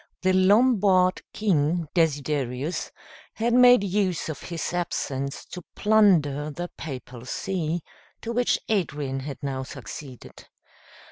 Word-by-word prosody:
The 185 0 +3
Lombard 190 -2 +4
king, 170 -5 +1
Desiderius, 145 -2 -1 0.4
had 235 +1 0
made 245 -3 +7
use 190 -4 0
of 155 - -5
his 170 0 -4
absence 140 -6 -3
to 180 - -6
plunder 170 -10 +3
the 175 +4 -6
papal 125 -5 -8
see, 170 0 -2 0.4
to 235 - -4
which 245 +1 +2
Adrian 145 -10 -1
had 135 0 -6
now 135 -1 -2
succeeded. 130 0 -10
170 Hz, 115 wpm, -25 LUFS, 140-195 Hz, 0.4 s, made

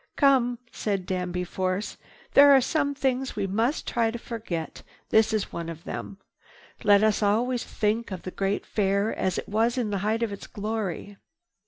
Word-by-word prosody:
"Come!" 260 -4 +3
said 200 -4 -2
Danby 180 -1 -2
Force, 185 +3 -2 0.4
"There 285 0 +8
are - - +7
some 285 +2 0
things 265 -1 -1
we 205 -2 -1
must 225 - 0
try 230 -1 +1
to 235 - -4
forget. 215 -9 -5 0.3
This 220 0 +4
is 215 -2 -2
one 170 -1 -4
of 165 0 -8
them. 195 - -6 0.7
Let 205 -1 +5
us 215 -1 +2
always 235 +4 +1
think 220 +2 -1
of 185 -3 -6
the 185 - -5
great 195 +2 -1
Fair 200 +1 +1
as 185 -2 -1
it - - -4
was 225 +4 +1
in 230 -4 -1
the 200 - -1
height 220 +4 0
of 225 - -1
its 200 - -9
glory." 205 -2 -4
210 Hz, 180 wpm, -26 LUFS, 195-235 Hz, 0.7 s, There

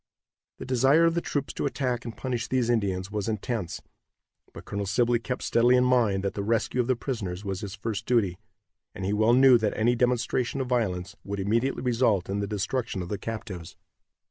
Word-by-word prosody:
The - - -7
desire 135 +6 +4
of 165 - +3
the 170 - 0
troops 145 -4 -3
to - - -1
attack 125 -3 -2
and 115 -3 -7
punish 125 -2 -3
these 130 -2 +1
savages 100 -4 0
was 105 -2 -2
intense, 110 -3 -3 0.7
but - - -11
Colonel 100 0 -3
Sibley 120 +4 +2
kept 125 +1 -4
steadily 120 +2 +4
in 125 - +4
mind 115 -6 +2
that 100 - -1
the 100 - -3
rescue 115 +4 +1
of 120 - -3
the 130 - +2
prisoners 105 -7 -4
was 95 -1 -3
his 100 -2 -6
first 105 0 -4
duty, 100 -7 +1 0.6
and 95 - -4
he 100 - 0
well 110 +3 +3
knew 130 -1 +7
that 110 -2 -1
any 120 +3 +3
demonstration 125 +1 0
of 130 - -1
violence 105 -8 -1
would 100 0 -4
immediately 115 +8 0
result 115 -7 +1
in 100 +1 -1
the 100 - -2
destruction 105 0 -2
of 85 - -8
the 105 - -3
captives. 105 -7 -6
115 Hz, 200 wpm, -27 LUFS, 100-125 Hz, 0.7 s, knew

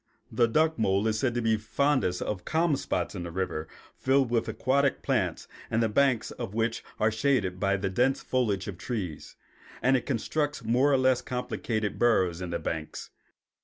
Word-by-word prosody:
The 120 - +3
duck 155 +5 +2
mole 100 -1 +2
is 110 -1 0
said 120 -1 0
to 120 - 0
be 110 -1 +3
fondest 110 -3 0
of 100 -4 -4
calm 160 -1 +1
spots - - -2
in 90 -4 -5
rivers 85 -3 -3 0.3
filled 135 -2 +2
with 115 -1 +1
aquatic 140 +1 +1
plants 110 - -1 0.2
and 115 +1 +1
the 115 - +1
banks 130 0 +2
of 100 - -6
which 115 0 -1 0.2
are 110 +1 +3
shaded 110 -6 0
by 100 0 +2
the 95 +1 -2
dense 125 +7 +1
foliage 105 -8 0
of 95 -3 -6
trees; 100 - -5 0.4
and 130 +1 +3
it 125 - -1
constructs 145 +2 -1
more 125 +6 +3
or 135 - +4
less 130 -1 +3
complicated 115 -4 -3
burrows 95 -7 +2
in 90 - -4
the 85 - -1
banks. 80 -2 -5
115 Hz, 180 wpm, -28 LUFS, 100-130 Hz, 0.4 s, or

